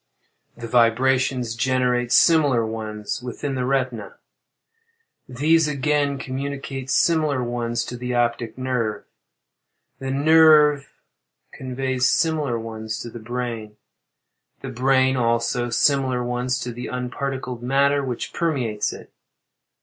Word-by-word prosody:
The 120 Hz, -1 st, -7 dB
vibrations 125 Hz, +1 st, +2 dB
generate 125 Hz, 0 st, 0 dB
similar 145 Hz, -9 st, +4 dB
ones 110 Hz, -1 st, -5 dB
within 125 Hz, +3 st, -5 dB
the 130 Hz, -1 st, -2 dB
retina; 125 Hz, -6 st, -2 dB, 1.1 s
these 155 Hz, +5 st, +2 dB
again 145 Hz, 0 st, 0 dB
communicate 135 Hz, 0 st, -5 dB
similar 155 Hz, -4 st, +2 dB
ones 120 Hz, -1 st, -2 dB
to 125 Hz, -, -6 dB
the 125 Hz, 0 st, -3 dB
optic 120 Hz, -1 st, -1 dB
nerve. 125 Hz, -5 st, -2 dB, 1.0 s
The 135 Hz, -, -5 dB
nerve 150 Hz, 0 st, +5 dB, 0.6 s
conveys 130 Hz, 0 st, -1 dB
similar 150 Hz, -5 st, 0 dB
ones 110 Hz, -1 st, -6 dB
to 120 Hz, -, -7 dB
the 120 Hz, -, -8 dB
brain; 115 Hz, -2 st, -5 dB, 0.8 s
the -, -, -6 dB
brain, 130 Hz, +1 st, +2 dB
also, 115 Hz, +1 st, 0 dB
similar 130 Hz, 0 st, +1 dB
ones 125 Hz, +1 st, -1 dB
to 125 Hz, -, -4 dB
the 120 Hz, +1 st, -6 dB
unparticled 125 Hz, 0 st, -4 dB
matter 140 Hz, +3 st, +2 dB
which 125 Hz, -3 st, -4 dB
permeates 130 Hz, -11 st, -1 dB
it. -, -, -12 dB
125 Hz, 110 wpm, -22 LUFS, 120-135 Hz, 1.1 s, nerve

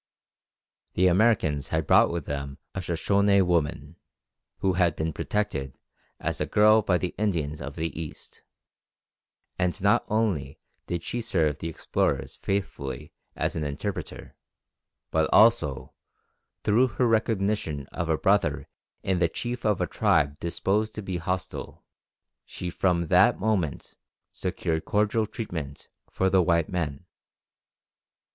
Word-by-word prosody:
The 90 Hz, -, +3 dB
Americans 90 Hz, -, +3 dB
had -, -, -1 dB
brought -, -, +5 dB
with 85 Hz, -4 st, -3 dB
them 70 Hz, -1 st, -5 dB, 0.2 s
a -, -, -3 dB
Soshone 100 Hz, +3 st, +2 dB
woman, 80 Hz, -2 st, -1 dB, 0.6 s
who 95 Hz, -1 st, +1 dB
had 85 Hz, -3 st, +2 dB
been 80 Hz, 0 st, -2 dB
protected 70 Hz, -12 st, -2 dB, 0.4 s
as -, -, -3 dB
a -, -, 0 dB
girl 110 Hz, +1 st, +5 dB
by 95 Hz, -4 st, +2 dB
the 90 Hz, 0 st, -3 dB
Indians 80 Hz, -9 st, -1 dB
of 70 Hz, +1 st, -6 dB
the 80 Hz, -1 st, -3 dB
east, 75 Hz, -, -10 dB, 1.2 s
and 90 Hz, +1 st, 0 dB
not 100 Hz, +1 st, +3 dB
only 95 Hz, -11 st, -1 dB, 0.3 s
did 85 Hz, -1 st, -3 dB
she 120 Hz, -, -3 dB
serve 80 Hz, -10 st, 0 dB
the 80 Hz, -, -4 dB
explorers 80 Hz, -, -1 dB
faithfully 95 Hz, -9 st, -4 dB, 0.2 s
as -, -, -1 dB
an 80 Hz, -, -2 dB
interpreter, 70 Hz, -1 st, -5 dB, 0.8 s
but 80 Hz, -1 st, +2 dB
also, 110 Hz, -, +4 dB, 0.7 s
through 115 Hz, +5 st, +4 dB
her 125 Hz, -, +3 dB
recognition 105 Hz, -, 0 dB
of 85 Hz, -2 st, -3 dB
a 80 Hz, -, +2 dB
brother -, -, +1 dB, 0.4 s
in 95 Hz, -2 st, 0 dB
the 85 Hz, -, +3 dB
chief 120 Hz, +5 st, -4 dB
of 105 Hz, -3 st, +1 dB
a -, -, +2 dB
tribe 70 Hz, 0 st, +1 dB
disposed 105 Hz, +5 st, -1 dB
to 105 Hz, -, -5 dB
be 95 Hz, -2 st, -3 dB
hostile, 90 Hz, +2 st, -4 dB, 0.6 s
she 90 Hz, -1 st, -6 dB
from 85 Hz, -1 st, +1 dB
that -, -, +5 dB
moment 95 Hz, -8 st, -1 dB, 0.4 s
secured 80 Hz, 0 st, -2 dB
cordial 105 Hz, +1 st, +1 dB
treatment 90 Hz, -, -6 dB, 0.2 s
for 95 Hz, -, 0 dB
the 95 Hz, 0 st, +4 dB
white 85 Hz, -2 st, +2 dB
men. 85 Hz, -3 st, -3 dB
90 Hz, 135 wpm, -26 LUFS, 80-105 Hz, 1.2 s, brought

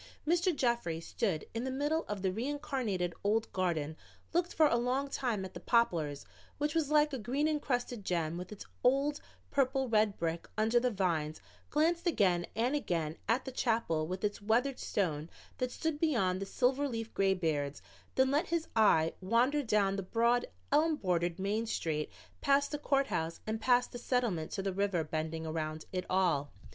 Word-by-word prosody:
Mr. 345 Hz, +2 st, +3 dB
Jeffries 235 Hz, -, 0 dB
stood 195 Hz, -10 st, -1 dB
in 230 Hz, +1 st, -2 dB
the 265 Hz, -, -2 dB
middle 295 Hz, +5 st, 0 dB
of 205 Hz, -2 st, -4 dB
the 190 Hz, -, +2 dB
reincarnated 245 Hz, -, -2 dB
old 215 Hz, +2 st, +1 dB
garden, 160 Hz, -5 st, -1 dB, 0.4 s
looked 350 Hz, +1 st, +1 dB
for 315 Hz, -, +4 dB
a 290 Hz, -, +4 dB
long 250 Hz, +4 st, 0 dB
time 235 Hz, -8 st, -1 dB
at 185 Hz, -, -9 dB
the 175 Hz, -, -7 dB
Poplars, 170 Hz, -11 st, +1 dB, 0.3 s
which 295 Hz, +1 st, 0 dB
was 320 Hz, -4 st, +1 dB
like 300 Hz, -1 st, +4 dB
a 265 Hz, -, -2 dB
green 265 Hz, +7 st, 0 dB
encrusted 245 Hz, -7 st, -1 dB
gem 170 Hz, -3 st, -1 dB
with 180 Hz, +2 st, -6 dB
its 210 Hz, -, -8 dB, 0.2 s
old 275 Hz, +3 st, +2 dB, 0.3 s
purple 265 Hz, -1 st, +2 dB
red 215 Hz, -3 st, +2 dB
brick 165 Hz, 0 st, -2 dB
under 225 Hz, +2 st, +3 dB
the 250 Hz, +1 st, +1 dB
vines, 170 Hz, -7 st, -1 dB, 0.3 s
glanced 335 Hz, +4 st, +2 dB
again 180 Hz, -, +2 dB
and 240 Hz, +5 st, +1 dB
again 165 Hz, -, -1 dB
at 235 Hz, +4 st, +2 dB
the 265 Hz, -, -4 dB
chapel 225 Hz, -11 st, 0 dB
with 185 Hz, +3 st, -4 dB
its 205 Hz, 0 st, -1 dB
weathered 245 Hz, +6 st, +1 dB
stone 160 Hz, -6 st, -1 dB, 0.3 s
that 255 Hz, -, 0 dB
stood 315 Hz, +3 st, -2 dB
beyond 195 Hz, -, +1 dB
the 195 Hz, -, -3 dB
silver 270 Hz, +6 st, +1 dB
leafed 225 Hz, -2 st, -4 dB
graybeards, 160 Hz, -7 st, +1 dB, 0.4 s
then 260 Hz, 0 st, +4 dB
let 300 Hz, +6 st, +2 dB
his 335 Hz, -1 st, -1 dB
eye 165 Hz, -8 st, +4 dB
wander 240 Hz, +9 st, +2 dB
down 210 Hz, -6 st, +2 dB
the -, -, -1 dB
broad 235 Hz, +5 st, +2 dB, 0.2 s
elm 310 Hz, +2 st, +4 dB
bordered 175 Hz, -, 0 dB
main 210 Hz, +4 st, -1 dB
street 155 Hz, -7 st, -2 dB, 0.3 s
past 280 Hz, 0 st, +3 dB
the 295 Hz, -, -2 dB
courthouse 210 Hz, -, 0 dB
and 220 Hz, 0 st, -3 dB
past 245 Hz, 0 st, +3 dB
the 245 Hz, -, -6 dB
Settlement 235 Hz, -11 st, 0 dB
to 195 Hz, -, -3 dB
the 195 Hz, -1 st, -1 dB
river 195 Hz, -3 st, +1 dB
bending 160 Hz, +1 st, -3 dB
around 155 Hz, -1 st, -3 dB
it 185 Hz, -1 st, -2 dB
all. 170 Hz, -7 st, +2 dB
220 Hz, 175 wpm, -32 LUFS, 175-270 Hz, 0.4 s, for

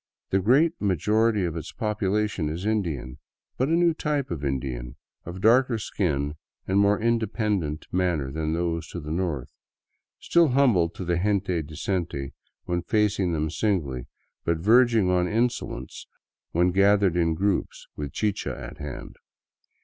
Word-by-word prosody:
The 95 Hz, -, +3 dB
great 135 Hz, -, +4 dB
majority 105 Hz, +2 st, +2 dB
of 85 Hz, -2 st, -3 dB
its 80 Hz, -, -6 dB
population 105 Hz, -5 st, -1 dB
is 85 Hz, +5 st, -4 dB
Indian, 85 Hz, -, -2 dB, 0.4 s
but 130 Hz, -, 0 dB
a -, -, +2 dB
new 170 Hz, 0 st, +4 dB
type 150 Hz, -, -2 dB
of 75 Hz, -4 st, -4 dB
Indian, 65 Hz, -2 st, -3 dB, 0.3 s
of 90 Hz, +2 st, -6 dB
darker 120 Hz, +2 st, +4 dB
skin 75 Hz, -9 st, -2 dB, 0.3 s
and 95 Hz, +1 st, +2 dB
more 100 Hz, +1 st, +3 dB
independent 105 Hz, -8 st, 0 dB
manner 85 Hz, -7 st, 0 dB
than 80 Hz, +1 st, -2 dB
those 85 Hz, -1 st, -2 dB
to 85 Hz, -, -6 dB
the 75 Hz, -1 st, -7 dB
north, 80 Hz, -7 st, -2 dB, 0.7 s
still 170 Hz, -1 st, +4 dB
humble 125 Hz, -, +3 dB
to 90 Hz, -, -7 dB
the 85 Hz, 0 st, +1 dB
gente 95 Hz, -3 st, 0 dB
decente 75 Hz, -2 st, -3 dB, 0.3 s
when 85 Hz, 0 st, -1 dB
facing 105 Hz, -2 st, +1 dB
them 80 Hz, -1 st, -1 dB
singly, 75 Hz, -, -1 dB, 0.4 s
but 85 Hz, -1 st, +1 dB
verging 110 Hz, +1 st, +4 dB
on 90 Hz, 0 st, +2 dB
insolence 115 Hz, -, -2 dB, 0.4 s
when 90 Hz, +2 st, +2 dB
gathered 100 Hz, -1 st, +4 dB
in 85 Hz, -2 st, +2 dB
groups 100 Hz, +3 st, -1 dB
with 75 Hz, -2 st, -5 dB
chicha 105 Hz, +4 st, -2 dB
at -, -, -9 dB
hand. 75 Hz, -1 st, -7 dB
90 Hz, 145 wpm, -25 LUFS, 80-105 Hz, 0.7 s, great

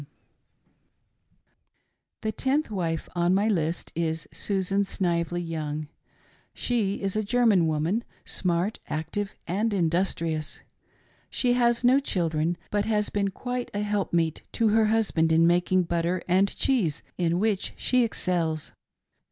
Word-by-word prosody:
[Number 145 Hz, -, -12 dB
Ten.] -, -, -39 dB, 2.1 s
The 220 Hz, -, -1 dB
tenth 270 Hz, +4 st, 0 dB
wife 165 Hz, -5 st, -2 dB
on 175 Hz, +1 st, +2 dB
my 205 Hz, +2 st, +2 dB
list 170 Hz, -5 st, -1 dB
is 160 Hz, -1 st, -2 dB
Susan 195 Hz, 0 st, 0 dB
Snively 175 Hz, -2 st, -1 dB
Young. 155 Hz, -2 st, -4 dB, 0.7 s
She 210 Hz, -5 st, -1 dB
is 195 Hz, 0 st, -1 dB
a 215 Hz, -, +2 dB
German 210 Hz, -6 st, +3 dB
woman 160 Hz, +9 st, 0 dB, 0.2 s
— -, -, -37 dB
smart, 180 Hz, +4 st, 0 dB
active, 165 Hz, +6 st, -3 dB
and 205 Hz, +6 st, 0 dB
industrious. 165 Hz, -3 st, -1 dB, 0.7 s
She 245 Hz, -1 st, +2 dB
has 240 Hz, -1 st, +2 dB
no 255 Hz, +3 st, +6 dB
children, 170 Hz, -, 0 dB
but 205 Hz, 0 st, +1 dB
has 210 Hz, -2 st, +1 dB
been 200 Hz, -1 st, 0 dB
quite 245 Hz, +5 st, -4 dB
a 205 Hz, -, 0 dB
help 205 Hz, -1 st, -1 dB
meet 165 Hz, -2 st, +1 dB
to 225 Hz, -2 st, +2 dB
her 220 Hz, +1 st, +4 dB
husband 210 Hz, -7 st, +2 dB
in 165 Hz, +1 st, +5 dB
making 180 Hz, +2 st, +3 dB
butter 170 Hz, +1 st, -1 dB
and 190 Hz, +2 st, +4 dB
cheese, 205 Hz, -, +1 dB, 0.2 s
in 170 Hz, -1 st, +2 dB
which 210 Hz, -2 st, 0 dB
she 250 Hz, -1 st, +2 dB
excels. 170 Hz, -8 st, -1 dB
185 Hz, 140 wpm, -26 LUFS, 165-215 Hz, 2.1 s, no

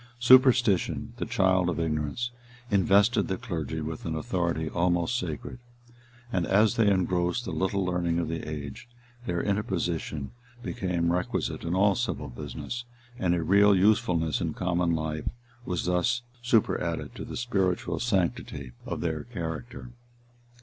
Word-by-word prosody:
Superstition, 120 Hz, -5 st, +4 dB
the -, -, -3 dB
child 95 Hz, -1 st, +2 dB
of 85 Hz, -, -2 dB
ignorance, 80 Hz, +9 st, -1 dB, 0.4 s
invested 100 Hz, +3 st, +4 dB
the 95 Hz, -, -2 dB
clergy 80 Hz, -, -4 dB
with 80 Hz, +1 st, -5 dB
an 80 Hz, -, -3 dB
authority 85 Hz, 0 st, -1 dB
almost 85 Hz, +6 st, +1 dB
sacred; 90 Hz, -, -4 dB, 0.7 s
and 90 Hz, -3 st, +1 dB
as 105 Hz, +4 st, +4 dB
they 110 Hz, -4 st, +4 dB
engrossed 90 Hz, +4 st, +1 dB
the -, -, -4 dB
little 95 Hz, 0 st, 0 dB
learning 90 Hz, -2 st, 0 dB
of 85 Hz, -2 st, 0 dB
the 80 Hz, 0 st, -3 dB
age, 75 Hz, -, -7 dB, 0.4 s
their 85 Hz, -1 st, -1 dB
interposition 90 Hz, -7 st, -2 dB, 0.3 s
became 90 Hz, -8 st, -1 dB
requisite 90 Hz, 0 st, -2 dB
in 85 Hz, +2 st, -1 dB
all 100 Hz, +1 st, +4 dB
civil 85 Hz, -, -2 dB
business, 120 Hz, -, -6 dB, 0.4 s
and 90 Hz, -6 st, +2 dB
a 85 Hz, -, -1 dB
real 100 Hz, +3 st, +5 dB
usefulness 90 Hz, -6 st, +2 dB
in -, -, -2 dB
common 90 Hz, -2 st, +1 dB
life 80 Hz, -1 st, -2 dB, 0.4 s
was 90 Hz, -2 st, -2 dB
thus 90 Hz, +8 st, +1 dB, 0.2 s
superadded 120 Hz, -3 st, +1 dB
to -, -, -7 dB
the -, -, -6 dB
spiritual 95 Hz, -8 st, 0 dB
sanctity 85 Hz, -, -1 dB, 0.2 s
of -, -, -3 dB
their 80 Hz, -3 st, -2 dB
character. 105 Hz, +3 st, -6 dB
90 Hz, 140 wpm, -28 LUFS, 80-105 Hz, 0.7 s, real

